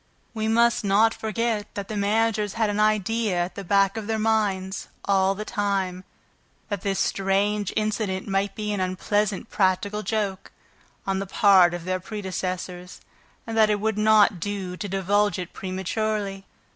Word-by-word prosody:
We 220 -1 -2
must 235 +1 +3
not 210 +3 +4
forget 220 -1 -2
that 200 -1 -4
the 215 - -5
managers 210 0 +1
had 220 -2 +1
an 205 - -2
idea 215 -1 +1
at 175 - -10
the 200 - -7
back 195 +2 +2
of 215 -2 -5
their 220 0 0
minds, 205 -4 0 0.2
all 195 -1 +2
the 215 +2 -5
time, 190 -3 -2 0.6
that 205 -3 -3
this 195 -1 -1
strange 195 +1 0
incident 215 -3 -1
might 195 0 -1
be 210 -1 -3
an 205 - -2
unpleasant 200 +3 -1
practical 200 +2 +1
joke 205 -3 -2 0.5
on 195 -1 0
the 195 - -4
part 185 -3 +5
of 175 -1 -7
their 185 0 -1
predecessors 185 -2 -5 0.4
and 225 - -5
that 220 -1 +5
it 210 -1 +1
would 215 0 -1
not 210 -3 +5
do 195 -1 -4
to 205 +2 -5
divulge 195 +1 +1
it 180 -1 -6
prematurely. 195 +1 -3
205 Hz, 160 wpm, -25 LUFS, 190-215 Hz, 0.6 s, part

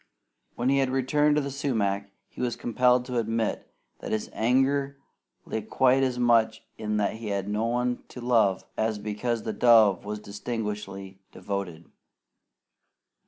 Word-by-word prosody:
When 120 +2 0
he 140 0 +3
had 135 -1 +1
returned 145 +3 +2
to 150 - +1
the 140 - -4
sumac, 105 -8 -1 0.2
he - - -10
was 125 -1 -1
compelled 125 +1 +2
to 125 -2 -1
admit 115 -1 -2 0.3
that - - -6
his 110 - -2
anger 135 +4 +1 0.5
lay 110 - -3
quite 130 +4 +3
as 130 -2 0
much 115 -2 +2
in 105 0 -2
that 105 +1 0
he 110 -1 -7
had 100 -1 -2
no 105 +2 -1
one 125 +1 -1
to - - -10
love 115 -6 +2
as 110 -1 0
because 110 +3 -3
the 110 - -3
dove 110 -6 +5
was 105 +1 -4
disgustingly 105 -3 -5
devoted. 90 -5 -5
115 Hz, 155 wpm, -27 LUFS, 105-125 Hz, 0.5 s, dove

